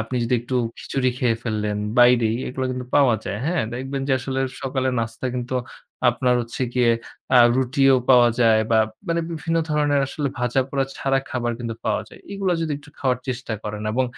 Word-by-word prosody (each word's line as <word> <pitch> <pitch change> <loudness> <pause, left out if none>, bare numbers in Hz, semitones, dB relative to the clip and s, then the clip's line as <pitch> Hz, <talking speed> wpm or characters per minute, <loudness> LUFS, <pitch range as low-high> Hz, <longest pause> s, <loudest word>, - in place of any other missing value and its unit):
আপনি 115 +3 -3
যদি 125 - +1
একটু 125 +1 -3 0.2
খিচুড়ি 130 -2 -1
খেয়ে 115 -3 +1
ফেললেন 105 -2 -2 0.2
বাইরেই, 120 -2 +5
এগুলা 130 +1 -3
কিন্তু 125 -1 -5
পাওয়া 135 -5 +5
যায়, 100 - -3
হ্যাঁ? 175 -4 +1
দেখবেন 135 +2 -4
যে - - +3
আসলে 135 +1 -3 0.2
সকালে 130 -1 -1
নাস্তায় 115 +3 -3
কিন্তু 125 +1 -4 0.6
আপনার 125 0 +1
হচ্ছে 120 +2 -5
গিয়ে 120 -2 +4 0.5
আ - - +8 0.2
রুটিও 135 +1 +3 0.2
পাওয়া 120 -2 +7
যায় 110 -2 +5
বা 110 - +5 0.3
মানে 170 0 +1
বিভিন্ন 165 +1 -2
ধরনের 145 -1 +2
আসলে 140 0 -3
ভাজাপোড়া 135 +3 0
ছাড়া 135 0 +1
খাবার 120 -2 -1
কিন্তু 115 -2 -4
পাওয়া 110 0 0
যায়। - - -15
এগুলা 195 -2 0
যদি 160 -2 -1
একটু 145 0 -17
খাওয়ার 130 -4 +1
চেষ্টা 125 -2 -3
করেন 105 0 -5
এবং 130 +2 +1
125 Hz, 180 wpm, -22 LUFS, 120-135 Hz, 0.6 s, আ